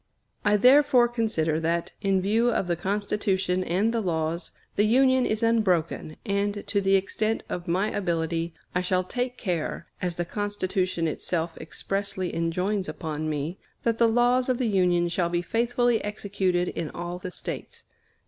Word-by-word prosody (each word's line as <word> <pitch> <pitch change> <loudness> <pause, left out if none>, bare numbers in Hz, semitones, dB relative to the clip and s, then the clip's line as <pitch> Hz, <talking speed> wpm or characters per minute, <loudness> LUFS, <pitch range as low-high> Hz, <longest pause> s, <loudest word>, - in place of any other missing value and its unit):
I 210 0 +4
therefore 250 +1 +6
consider 215 -10 0
that, 165 +1 -1
in 195 -2 +2
view 225 +5 +3
of 225 - 0
the 175 -1 0
Constitution 195 -1 0
and 195 +7 +1
the 230 - +1
laws, 165 -2 -2 0.2
the 205 - +3
Union 260 +2 +4
is 215 +1 -1
unbroken, 185 -9 +1
and, 200 0 -1
to 200 -1 0
the 195 0 +3
extent 215 +3 0
of 175 - -4
my 190 +5 +1
ability, 165 -3 -1 0.2
I 180 - +1
shall 185 0 +1
take 245 +6 -3
care, 170 -3 -2 0.2
as 180 -2 -1
the 175 - -2
Constitution 185 -3 -1
itself 165 +1 -2
expressly 195 +2 -3
enjoins 185 +4 -1
upon 155 -2 -4
me, 155 +4 -3 0.2
that 230 -1 0
the 230 -1 +5
laws 245 +2 +3
of 255 - +2
the 250 - 0
Union 180 -4 +3
shall 170 0 0
be 175 0 0
faithfully 240 +2 +1
executed 195 -4 -1
in 165 -3 -4
all 175 +1 -5
the 185 - -5
States. - - -6
190 Hz, 160 wpm, -26 LUFS, 175-220 Hz, 0.2 s, therefore